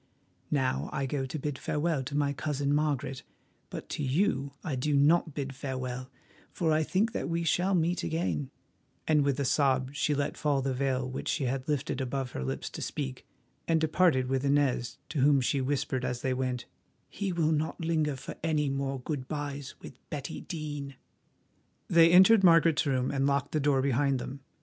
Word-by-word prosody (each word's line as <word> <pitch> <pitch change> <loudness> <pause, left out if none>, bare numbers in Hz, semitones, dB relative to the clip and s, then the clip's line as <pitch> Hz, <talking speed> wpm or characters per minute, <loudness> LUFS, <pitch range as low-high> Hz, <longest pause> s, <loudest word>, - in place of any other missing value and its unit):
Now 130 - 0
I 135 - -1
go 135 0 -2
to 145 - -4
bid 145 -2 -4
farewell 150 -1 0
to 145 +1 -3
my 140 -1 +1
cousin 145 -1 -1
Margaret, 145 -3 0 0.5
but - - -7
to 150 - -3
you 140 -1 +1
I 155 -6 -2
do 145 +3 0
not 155 +2 +3
bid 135 -2 -3
farewell, 130 -2 -5 0.4
for 165 -3 0
I 155 0 +3
think 195 +8 +1
that 220 - -3
we 170 0 0
shall 180 +4 +2
meet 175 +1 +1
again," 160 -4 -1 0.6
and 150 -2 +4
with 140 -1 0
a 140 - 0
sob 130 -1 +2
she 145 0 +1
let 145 +1 -2
fall 140 -3 +1
the 135 -1 0
veil 130 -1 0
which 130 - -5
she 145 - 0
had 130 +1 -2
lifted 145 -2 -1
above 130 0 -3
her 65 - -4
lips 65 - -3
to - - -7
speak 65 -1 -4 0.4
and 165 -1 +3
departed 160 -4 +3
with 130 +1 -1
Inez, 140 -4 +1
to 155 - -3
whom 140 +1 +5
she 135 +2 0
whispered 130 -1 -1
as 125 -1 -3
they 130 - +1
went, 130 -1 -2 0.4
"He 200 -2 -3
will 165 -3 +1
not 155 +1 -1
linger 155 -3 +1
for 130 - -7
any 155 -3 +1
more 135 -1 -2
good 130 -2 -4
byes 145 -3 -5
with - - -9 0.2
Betty 140 -3 -5
Dene." 145 -4 -5 0.9
They 165 -1 +6
entered 190 +4 +7
Margaret's 165 -4 +5
room 130 -2 +1
and 140 0 +1
locked 140 0 0
the 155 - +1
door 140 -2 +2
behind 140 0 +2
them. 130 +2 -6
140 Hz, 190 wpm, -29 LUFS, 130-155 Hz, 0.9 s, entered